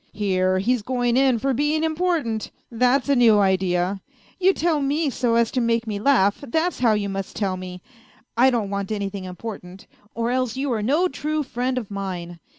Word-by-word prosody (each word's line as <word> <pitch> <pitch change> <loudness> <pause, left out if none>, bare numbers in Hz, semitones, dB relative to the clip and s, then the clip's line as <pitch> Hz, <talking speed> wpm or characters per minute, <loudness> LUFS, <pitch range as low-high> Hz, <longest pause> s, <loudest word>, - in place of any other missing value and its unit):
" - - -37
Here, 185 -2 +1
he's 235 +5 +1
going 245 +1 0
in 260 -2 +3
for 270 +4 0
being 295 +4 0
important! 315 - -1 0.2
That's 250 +4 +2
a 280 - +3
new 235 -4 +5
idea! 190 -1 +1 0.4
You 380 +1 +5
tell 330 -5 0
me 285 +2 0
so 240 -2 0
as 230 -1 +2
to 255 - 0
make 230 0 +1
me 210 -2 -3
laugh, 210 -2 +2
that's 325 +8 0
how 235 -3 +4
you 210 -1 -1
must 195 -1 -5
tell 195 -3 -1
me; 180 -1 -8 0.5
I 250 +3 +5
don't 225 -6 -1
want 200 0 -3
anything 200 -2 -3
important; 185 -1 -8 0.3
or 230 +1 -1
else 255 -1 -1
you 270 -1 -1
are 220 - -1
no 295 - +2
true 305 -3 -2
friend 255 0 -2
of 225 -5 -4
mine. 180 -4 -5
230 Hz, 195 wpm, -23 LUFS, 195-270 Hz, 0.5 s, new